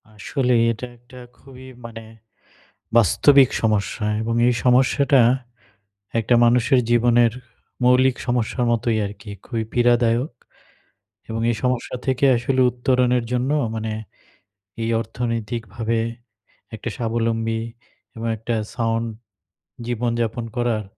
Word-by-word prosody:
আসলে 125 +5 -1 0.2
এটা 120 +2 -6
একটা 120 +2 -17 0.2
খুবই 130 -1 -14 0.2
মানে 115 -1 -9 0.9
বাস্তবিক 135 - +5
সমস্যা 105 0 0 0.2
এবং 115 +1 -2
এই 125 - +2
সমস্যাটা 130 +1 +4 1.0
একটা 120 +2 +1
মানুষের 125 +2 +3
জীবনের 120 -1 +4 0.5
মৌলিক 125 +1 +4
সমস্যার 120 0 0
মতোই 115 -1 0
আরকি 105 +1 -10
খুবই 115 -3 -3
পীড়াদায়ক। 120 +2 +2 1.0
এবং 115 0 -3
এই 115 - -1
সমস্যা 125 0 -1
থেকে 130 +1 +1
আসলে 130 +2 0
উত্তরণের 125 -1 +1
জন্য 125 +2 0 0.3
মানে 110 0 -3 0.9
এই 115 - -1
অর্থনৈতিকভাবে 115 -1 -3 0.8
একটা 110 +2 -5
স্বাবলম্বী 115 -1 -1 0.6
এবং 115 +1 -4
একটা 115 +2 -3 0.2
সাউন্ড 115 0 -1 0.8
জীবনযাপন 120 -1 -2
করার 120 -3 0
120 Hz, 105 wpm, -22 LUFS, 115-125 Hz, 1.0 s, বাস্তবিক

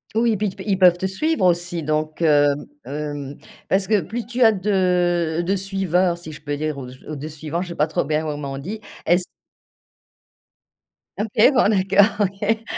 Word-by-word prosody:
Oui, 230 +1 +3
et 215 - 0
puis, 210 0 0
t - - -9
ils 195 -2 +2
peuvent 180 -2 +6
te 185 - -3
suivre, 195 - 0
aussi? 175 -1 +1
Donc, 155 +2 -2
hem, 145 -2 +3 0.2
hem, 145 -1 -5 0.3
parce 195 0 +2
que 210 -2 +3
plus 225 +8 -5
tu 245 +3 -4
as 225 -2 +7
de 180 -4 +1
de 195 - +1
suiveurs, 185 -2 0
si 165 -2 -10
je 150 - -11
peux 145 -1 -3
dire, 155 -1 -3
ou 125 -2 -7
j 130 - -12
ou 155 - -5
de 150 +2 -6
suivants, 155 +2 -4
je 185 - -5
sais 170 - -6
pas 150 - +2
trop 155 - -1
bien 155 +1 0
comment 145 -3 -4
on - - -5
dit. 200 +10 -6 0.2
Est-ce 175 +2 +3 1.9
OK 215 +4 +3
bon, 240 -5 +4
d'accord, 200 +1 +3
OK. 210 +3 -2
175 Hz, 195 wpm, -21 LUFS, 155-200 Hz, 1.9 s, as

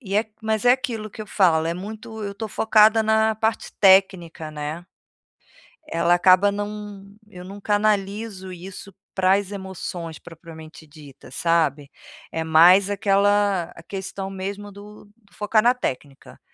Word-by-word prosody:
e 200 -6 -6
é 215 - +2 0.2
mas 220 +1 -1
é 245 - +6
aquilo 240 -5 -3
que 215 - -11
eu - - -12
falo, 170 -6 +2
é 165 - -2
muito 220 +4 -8
eu 200 0 -5
tô 220 +2 -5
focada 220 +1 +4
na 220 0 +2
parte 220 +1 -2
técnica, 190 -5 +3
né. 155 +3 -6 1.0
Ela 170 +1 +1
acaba 185 +3 +4
não 205 -1 -6 0.2
eu 180 -3 -11
não 195 +2 -10
canalizo 205 -1 -1
isso 190 +2 -10 0.2
para 185 0 +3
as 200 0 -1
emoções 180 -4 -7
propriamente 160 -1 -13
dita, 145 -3 -15
sabe, 150 -3 0 0.4
é 160 - -3
mais 175 +5 +6
aquela 200 -2 +1
a 165 - -13
questão 195 +1 -6
mesmo 200 +2 -6
do 205 +2 -13
do 205 0 -28
focar 215 +1 +1
na 245 +1 +5
técnica. 140 - -6
195 Hz, 150 wpm, -22 LUFS, 170-210 Hz, 1.0 s, é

